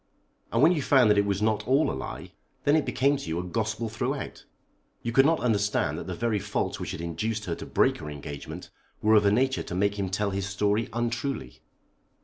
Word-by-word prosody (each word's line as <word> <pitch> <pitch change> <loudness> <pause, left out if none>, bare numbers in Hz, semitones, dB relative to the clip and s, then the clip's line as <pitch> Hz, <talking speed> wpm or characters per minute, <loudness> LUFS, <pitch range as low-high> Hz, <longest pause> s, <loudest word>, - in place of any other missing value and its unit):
"And 115 +4 +2
when 160 - +7
you 165 -5 +1
found 130 -5 +5
that 105 - +3
it 100 - +1
was 100 +1 0
not 110 0 0
all 135 +4 +3
a - - -3
lie, 65 - -6 0.3
then 145 - +4
it 155 - +1
became 140 +2 +2
to 110 - -7
you 80 - -1
a 90 - -2
gospel 110 +4 -2
throughout. 120 +5 -4 0.6
You 115 - -2
could 135 +4 +5
not 165 0 +2
understand 105 -4 +1
that - - -7
the - - -4
very 115 -2 0
faults 105 +1 -2
which - - -4
had - - -5
induced 105 +6 -3
her 85 - -2
to - - -7
break - - +2
her 75 - -6
engagement 70 -1 -8 0.3
were 110 +1 +5
of 105 -2 +5
a - - +4
nature 130 +4 +2
to 90 - -6
make 100 +2 +1
him 95 -1 -1
tell 100 +1 -1
his 95 0 -2
story 105 +2 0
untruly." 120 - -3
110 Hz, 225 wpm, -27 LUFS, 100-125 Hz, 0.6 s, when